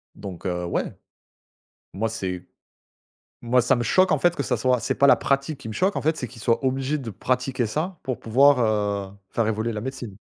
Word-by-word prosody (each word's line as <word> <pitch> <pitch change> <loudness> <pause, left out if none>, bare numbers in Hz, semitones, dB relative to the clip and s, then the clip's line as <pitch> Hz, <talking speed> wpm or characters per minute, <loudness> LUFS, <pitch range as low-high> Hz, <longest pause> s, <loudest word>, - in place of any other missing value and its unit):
donc 95 -2 -9
heu, 90 -1 -2
ouais. 85 - -2 1.0
Moi, 110 +3 -1
c'est 95 -5 -5 1.0
moi 125 +1 +3
ça 130 +2 +3
me 120 - -1
choque 185 +8 +3
en 150 - +3
fait 175 +3 +3
que 140 - -2
ça 125 - 0
soit 125 +1 +1
c'est - - -1
pas 140 - +4
la - - +8
pratique 140 +1 -1
qui 110 - -8
me 110 - -6
choque 190 +2 +1
en - - 0
fait, 160 +2 +1
c'est 125 - -4
qu'ils 115 -2 -13
soient 115 +3 +1
obligés 135 +3 0
de 125 -5 -6
pratiquer 125 +4 -1
ça 160 - -3
pour 130 -2 -3
pouvoir, 135 +4 +4 0.5
heu, - - -17 0.2
faire 115 -2 0
évoluer 110 +2 -1
la 105 - -4
médecine. 125 -5 -6
125 Hz, 215 wpm, -24 LUFS, 110-140 Hz, 1.0 s, la